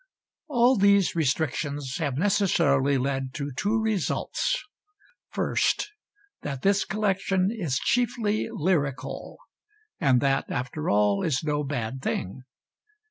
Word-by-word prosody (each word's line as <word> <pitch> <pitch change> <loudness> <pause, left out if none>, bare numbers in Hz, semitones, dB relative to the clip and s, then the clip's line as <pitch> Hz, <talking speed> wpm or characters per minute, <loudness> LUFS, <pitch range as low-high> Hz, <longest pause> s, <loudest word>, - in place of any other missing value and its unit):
All 250 -3 +4
these 200 -1 +4
restrictions 145 -2 -1
have 145 -6 -2
necessarily 160 -8 +2
led 135 0 -2
to 145 -1 -4
two 210 - +1
results. 220 - -1 0.7
First, 415 - 0 0.5
that 140 -3 -5
this 200 0 +3
collection 195 -2 0
is 170 - -2
chiefly 230 - 0
lyrical 145 -6 -2 0.6
and 135 -6 +4
that, 135 0 +1
after 130 +5 -3
all, 100 -1 +3
is 145 -3 0
no 150 -1 0
bad 130 -3 -3
thing. 100 0 -3
150 Hz, 110 wpm, -26 LUFS, 135-200 Hz, 0.7 s, All